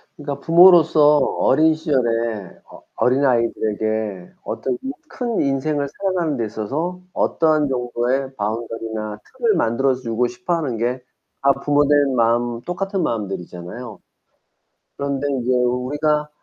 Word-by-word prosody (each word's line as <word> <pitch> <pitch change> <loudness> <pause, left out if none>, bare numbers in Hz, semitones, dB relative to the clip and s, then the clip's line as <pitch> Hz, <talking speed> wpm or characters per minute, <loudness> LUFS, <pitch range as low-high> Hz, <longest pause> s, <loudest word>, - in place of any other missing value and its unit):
그러니까 145 -1 -5
부모로서 165 -3 +6
어린 155 +5 +3
시절에 115 - -1
어 - - -13
어린아이들에게 110 -6 0
어떤 125 -2 -3 0.3
큰 240 -3 -2
인생을 140 +1 0
살아가는 175 -7 -1
데 115 - -1
있어서 145 - -4
어떠한 155 -3 +2
정도의 125 +1 -1
바운더리나 110 0 -4 0.2
틀을 230 -5 +2
만들어 130 0 +1
주고 120 -1 -1
싶어 185 -1 -4
하는 135 -9 -2
게 125 +2 -2 0.4
다 140 0 +5
부모 145 0 +3
된 145 -2 +3
마음 120 0 +1
똑같은 190 +3 -2
마음들이잖아요. 100 +1 -5 1.0
그런데 140 0 -2
인제 130 -2 -1
우리가 145 +5 0
130 Hz, 300 characters per minute, -21 LUFS, 115-150 Hz, 1.0 s, 부모로서